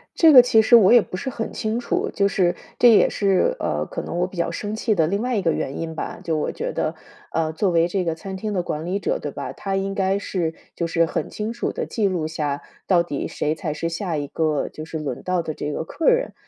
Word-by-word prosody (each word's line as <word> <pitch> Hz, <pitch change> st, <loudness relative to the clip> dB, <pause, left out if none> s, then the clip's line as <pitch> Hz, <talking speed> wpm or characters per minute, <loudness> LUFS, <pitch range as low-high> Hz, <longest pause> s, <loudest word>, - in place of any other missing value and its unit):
这 325 Hz, -2 st, +7 dB
个 255 Hz, -3 st, +11 dB
其 235 Hz, -2 st, +4 dB
实 230 Hz, +2 st, +7 dB
我 205 Hz, -3 st, +6 dB
也 240 Hz, -, +8 dB
不 185 Hz, -, -6 dB
是 265 Hz, +8 st, -4 dB
很 225 Hz, -2 st, -4 dB
清 220 Hz, +2 st, -1 dB
楚， -, -, -1 dB
就 200 Hz, 0 st, +3 dB
是 185 Hz, -3 st, +1 dB, 0.2 s
这 240 Hz, -, +7 dB
也 215 Hz, -, +6 dB
是， 200 Hz, -, +1 dB
呃， -, -, -1 dB
可 -, -, -5 dB
能 -, -, -4 dB
我 180 Hz, -, +2 dB
比 185 Hz, -, -12 dB
较 170 Hz, 0 st, 0 dB
生 205 Hz, +5 st, -4 dB
气 220 Hz, 0 st, +1 dB
的 165 Hz, -5 st, +2 dB
另 200 Hz, +6 st, -1 dB
外 250 Hz, 0 st, -1 dB
一 -, -, +2 dB
个 165 Hz, -2 st, +2 dB
原 135 Hz, -, -3 dB
因 165 Hz, -1 st, -4 dB
吧。 -, -, -5 dB
就 165 Hz, -2 st, -1 dB
我 150 Hz, -, -1 dB
觉 -, -, -3 dB
得， -, -, -1 dB, 0.4 s
呃， 160 Hz, -1 st, 0 dB
作 190 Hz, +4 st, +1 dB
为 170 Hz, 0 st, +3 dB
这 185 Hz, +1 st, -1 dB
个 165 Hz, -2 st, -1 dB
餐 190 Hz, +4 st, -7 dB
厅 210 Hz, +2 st, -4 dB
的 185 Hz, -3 st, 0 dB
管 155 Hz, -2 st, -4 dB
理 185 Hz, +3 st, -1 dB
者， -, -, -1 dB
对 -, -, -5 dB
吧？ -, -, -5 dB
他 195 Hz, -1 st, -4 dB
应 195 Hz, 0 st, -1 dB
该 195 Hz, 0 st, +1 dB
是 175 Hz, -5 st, -2 dB, 0.2 s
就 170 Hz, -, -1 dB
是 165 Hz, 0 st, +2 dB
很 -, -, -3 dB
清 215 Hz, +1 st, -4 dB
楚 235 Hz, +1 st, -3 dB
地 -, -, -3 dB
记 210 Hz, -4 st, 0 dB
录 175 Hz, -5 st, -1 dB
下， 150 Hz, -3 st, -2 dB, 0.3 s
到 180 Hz, -3 st, +4 dB
底 160 Hz, -5 st, -4 dB
谁 150 Hz, +1 st, -1 dB
才 160 Hz, -2 st, -4 dB
是 165 Hz, +3 st, -2 dB
下 165 Hz, -1 st, -3 dB
一 145 Hz, -, -3 dB
个 155 Hz, -1 st, 0 dB
就 155 Hz, -, -8 dB
是 160 Hz, 0 st, -5 dB
轮 140 Hz, -4 st, -4 dB
到 185 Hz, -1 st, 0 dB
的 160 Hz, -2 st, -4 dB
这 150 Hz, 0 st, -4 dB
个 -, -, -2 dB
客 240 Hz, -, -1 dB
人。 -, -, +1 dB
180 Hz, 290 characters per minute, -22 LUFS, 160-210 Hz, 0.4 s, 个